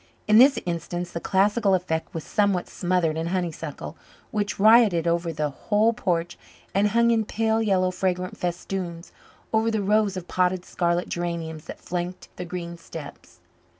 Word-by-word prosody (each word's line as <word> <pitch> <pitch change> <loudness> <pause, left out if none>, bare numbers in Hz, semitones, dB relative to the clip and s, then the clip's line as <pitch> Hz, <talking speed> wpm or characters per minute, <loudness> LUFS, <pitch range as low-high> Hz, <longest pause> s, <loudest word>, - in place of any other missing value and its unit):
In 215 +1 +6
this 270 +2 +7
instance 175 0 -3
the 170 - -4
classical 200 +2 +2
effect 165 -3 -2
was 165 - -5
somewhat 200 -1 +1
smothered 175 -3 0
in 165 +1 -2
honeysuckle, 175 -3 -4 0.4
which 205 -4 -2
rioted 215 -5 +6
over 170 0 0
the 150 -2 -2
whole 215 +9 +1
porch 175 -5 -2 0.3
and 200 +2 +3
hung 235 +3 +3
in 225 -1 +2
pale 220 +1 0
yellow, 185 -4 +2
fragrant 185 0 -2
festoons 175 -1 -4 0.4
over 220 +1 +3
the 220 -2 -1
rows 205 -1 +2
of 180 - -6
potted 180 0 0
scarlet 175 0 0
geraniums 165 -2 -4
that - - -9
flanked 180 +1 -5
the 180 - -5
green 170 -1 -6
steps. 150 -4 -11
180 Hz, 155 wpm, -25 LUFS, 170-205 Hz, 0.4 s, this